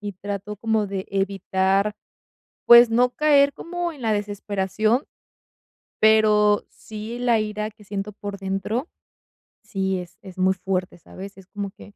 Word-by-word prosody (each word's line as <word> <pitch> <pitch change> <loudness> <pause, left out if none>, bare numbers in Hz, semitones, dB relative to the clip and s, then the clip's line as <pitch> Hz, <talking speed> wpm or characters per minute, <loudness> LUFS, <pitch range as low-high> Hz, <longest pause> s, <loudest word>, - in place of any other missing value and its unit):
y 205 -1 -5
trato 200 +2 -6
como 220 0 0
de 195 -1 -5
evitar, 195 +1 0 0.7
pues, 235 0 +8
no 245 +2 +3
caer 285 0 +4
como 345 +1 -4
en 280 - -13
la 220 -2 +1
desesperación, 205 +3 -1 1.0
pero 210 -1 +4
sí, 220 +2 -8
la 240 -2 +2
ira 210 0 -3
que 210 -1 -19
siento 200 +1 -4
por 205 0 -7
dentro, 195 - -3 0.7
sí 190 -2 -2
es 180 +2 -10
es 190 -4 -12
muy 185 0 +3
fuerte, 185 -1 -3
¿sabes? 195 +4 -11
Es 190 - -14
como 200 +1 -5
que 205 +1 -16
205 Hz, 145 wpm, -23 LUFS, 195-220 Hz, 1.0 s, pues